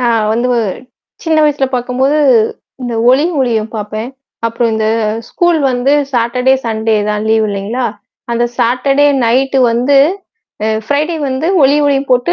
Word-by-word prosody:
நான் 235 -3 +1
வந்து 240 +3 0
ஒ - - +2 0.6
சின்ன 325 -1 0
வயசுல 290 -2 +1
பார்க்கும்போது 255 +4 0 0.6
இந்த 245 -2 -4 0.2
ஒளி 270 +4 +3 0.2
ஒலியும் 225 -4 -1
பார்ப்பேன். 215 +2 -5 0.4
அப்புறம் 230 0 -1
இந்த 220 0 -1 0.4
ஸ்கூல் 345 -2 +1
வந்து 250 +3 0 0.2
சாட்டர்டே, 250 +2 +1
சன்டே 220 -1 0
தான் 210 0 -2
லீவு 220 -1 +2
இல்லேங்களா! 205 +5 -3 0.5
அந்த 235 0 0
சாட்டர்டே 275 +4 +2 0.2
நைட் 265 +4 +1
வந்து 250 +5 +2 0.7
அ - - +1 0.2
ப்ரை 285 0 +2
டே 340 - -3
வந்து 265 +4 -2 0.2
ஒளிஒலியும் 280 0 +2
போட்டு 250 +7 +2
250 Hz, 140 wpm, -13 LUFS, 230-275 Hz, 0.7 s, ஒளி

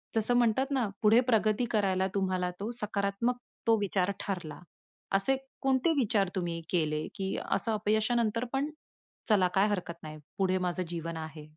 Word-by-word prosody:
जसं 225 +2 +3
म्हणतात 245 +3 +3
ना 255 -6 +1
पुढे 220 +2 +6
प्रगती 220 +1 +3
करायला 190 -3 +2
तुम्हाला 185 -2 0
तो 210 +3 -3
सकारात्मक 210 +4 -1 0.3
तो 225 - +5
विचार 195 -1 0
ठरला. 175 -7 -4 0.6
असे 265 +7 +2 0.2
कोणते 270 +4 +2
विचार 205 -6 +2
तुम्ही 170 -2 -2
केले, 155 -3 0
की 195 0 -2 0.2
असं 225 - +1
अपयशानंतर 220 +2 +1
पण, 280 +3 0 0.6
"चला 190 -4 +5
काय 195 +2 +4
हरकत 175 -4 -3
नाही, 155 0 -7 0.2
पुढे 185 -1 +2
माझं 180 +1 -1
जीवन 165 -1 -4
आहे?" 155 -1 -7
200 Hz, 150 wpm, -30 LUFS, 180-225 Hz, 0.6 s, पुढे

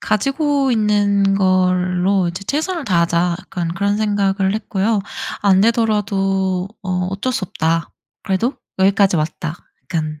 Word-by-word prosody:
가지고 275 +4 +1
있는 205 -2 +2
걸로 185 0 +2
이제 185 +3 -6
최선을 315 - -2
다하자.' 170 -3 +1
약간 175 -3 -4
그런 200 +2 0
생각을 200 -2 +1
했고요. 215 0 0 0.4
'안 195 -2 +4
되더라도 195 -5 +1
어 185 - -4 0.2
어쩔 200 +7 -2
수 215 - -1
없다. 165 -4 -1 0.3
그래도 215 +8 0 0.2
여기까지 195 -1 +3
왔다.' 155 0 -3 0.3
약간 155 -4 -3
195 Hz, 275 characters per minute, -19 LUFS, 185-210 Hz, 0.4 s, 안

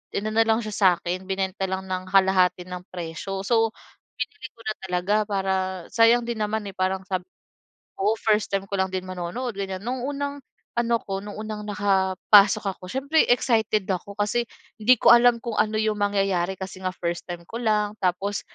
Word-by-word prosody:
inano 215 +2 +1
lang 225 0 +2
siya 215 - -5
sa 195 -2 +4
akin, 180 +2 -4
binenta 190 0 -1
lang 190 0 -3
ng 185 0 -3
kalahati 185 -2 +3
ng 180 0 -7
presyo. 180 +3 -5
So, 225 -1 +3 0.5
binili 430 - -5
ko - - -28
na 215 - -2
talaga 180 +3 0
para 195 -1 0 0.4
sayang 230 +1 +5
din 235 -2 -3
naman, 210 0 -1
eh, 190 - -12
parang 190 0 0
sabi 185 -1 -2 0.8
oo 215 +3 +3
first 215 -1 +1
time 195 0 -1
ko 200 - -2
lang 190 - 0
din 185 0 -2
manonood, 185 +7 -4
ganyan. 190 -1 -3
Noong 250 0 -2
unang 285 0 -3 0.4
ano 235 0 +2
ko, 195 -1 -3
noong 210 0 -8
unang 215 -1 -5
nakapasok 200 +1 +4
ako - - -23
siyempre 280 +4 +2
excited 220 -5 +2
ako, 195 +2 -3
kasi 210 +3 0 0.4
hindi 250 +4 +6
ko - - +6
alam 240 0 +5
kung 235 -2 -3
ano 215 0 +2
yung 215 -1 0
mangyayari 195 -2 +1
kasi 190 0 -7
nga 185 - 0
first 170 0 -3
time 175 -1 -6
ko 230 - -6
lang. 210 -2 +1
Tapos, 195 +3 0
200 Hz, 185 wpm, -24 LUFS, 190-220 Hz, 0.8 s, hindi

